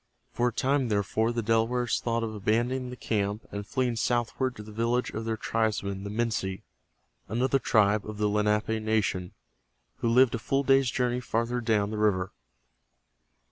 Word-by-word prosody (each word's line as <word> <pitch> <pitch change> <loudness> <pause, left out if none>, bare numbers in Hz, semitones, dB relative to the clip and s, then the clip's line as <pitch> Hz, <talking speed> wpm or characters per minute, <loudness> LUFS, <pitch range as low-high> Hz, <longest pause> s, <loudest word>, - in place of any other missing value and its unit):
For 120 - +1
a - - +1
time, 135 0 +1
therefore, 110 +2 +1
the 120 -1 -2
Delawares 115 +2 +1
thought 115 -1 -1
of 110 -1 -3
abandoning 120 +5 0
the 125 - -7
camp 105 -3 -2
and 100 0 -5
fleeing 125 -2 0
southward 120 +2 0
to 105 - -8
the 105 - -11
village 115 +3 0
of 110 +1 -5
their 110 -1 -1
tribesmen, 100 -4 -1
the 100 - -5
Minsi, 105 -4 -2 0.6
another 130 +6 +1
tribe 105 -4 +3
of 105 - -6
the 105 0 +1
Lenape 105 +1 +1
nation 105 -5 0 0.6
who 115 - 0
lived 125 +1 +5
a 115 - -1
full 135 +4 0
day's 135 -1 +4
journey 125 +1 0
farther 120 0 -1
down 110 -3 +1
the 110 - -3
river. 95 -3 +1
115 Hz, 170 wpm, -28 LUFS, 105-120 Hz, 0.6 s, lived